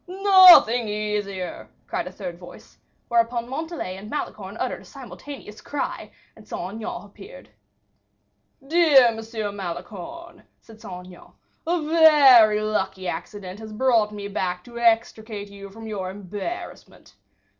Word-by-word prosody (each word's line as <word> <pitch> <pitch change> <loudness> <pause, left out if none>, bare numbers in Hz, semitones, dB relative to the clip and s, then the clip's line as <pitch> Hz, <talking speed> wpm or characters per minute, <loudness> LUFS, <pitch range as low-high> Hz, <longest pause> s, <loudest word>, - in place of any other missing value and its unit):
"Nothing 370 - +7
easier," 210 -3 -4 0.2
said - - -3
a - - -7
third - - -8
voice; - - -14 0.3
whereupon 235 0 0
Montalais 290 - -5
and 205 +2 -10
Malicorne 295 - -5
uttered - - -3
a - - -16
simultaneous 270 -7 -11
cry, 290 - -5 0.3
and - - -17
Saint 190 - -6
Aignan 220 -1 -6
appeared. 415 - -14 1.2
"Dear 290 -6 +5
Monsieur 220 -2 -5
Malicorne," 195 - -8 0.2
said 220 -1 -17
Saint 180 -1 -9
Aignan, 180 -1 -15 0.3
"a 345 0 +1
very 275 -10 +6
lucky 195 -3 -2
accident 185 +3 -6
has 220 -1 -9
brought 225 -2 +2
me 205 -1 -6
back 180 -2 -3
to 235 -1 -10
extricate 225 -3 0
you 200 0 -10
from 225 +3 -11
your 200 -4 -4
embarrassment. 205 - -8
220 Hz, 130 wpm, -23 LUFS, 200-265 Hz, 1.2 s, Nothing